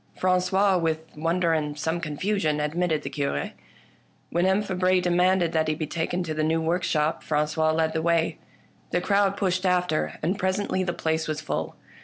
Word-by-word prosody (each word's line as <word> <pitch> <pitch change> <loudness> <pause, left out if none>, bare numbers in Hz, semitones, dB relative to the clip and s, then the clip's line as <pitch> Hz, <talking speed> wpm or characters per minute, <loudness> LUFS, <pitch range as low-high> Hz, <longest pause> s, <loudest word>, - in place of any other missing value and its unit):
Frangois, 185 +1 +2
with 160 -1 -1
wonder 165 +2 +1
and 150 -2 -1
some 160 +3 -2
confusion, 155 0 -1
ad 150 0 -1
mitted 175 -3 0
the - - -4
Cure. 140 - -2 0.8
When 175 +2 +2
M. 190 +2 +2
Fabre 185 -1 +2
demanded 180 0 +2
that 160 -1 +1
he 155 - +1
be 155 - -3
taken 170 +3 -2
to 160 -2 -3
the 155 0 -1
new 160 +1 +2
workshop, 160 -2 0
Frangois 155 +1 +1
led 160 0 +1
the 160 - 0
way. 165 0 +1 0.5
The - - +1
crowd 200 +1 +2
pushed 185 -2 0
after, 180 -4 0
and 180 +5 0
presently 190 0 0
the 175 - -1
place 160 -1 -1
was 155 -1 -2
full. 155 - -3
170 Hz, 180 wpm, -25 LUFS, 155-185 Hz, 0.8 s, Frangois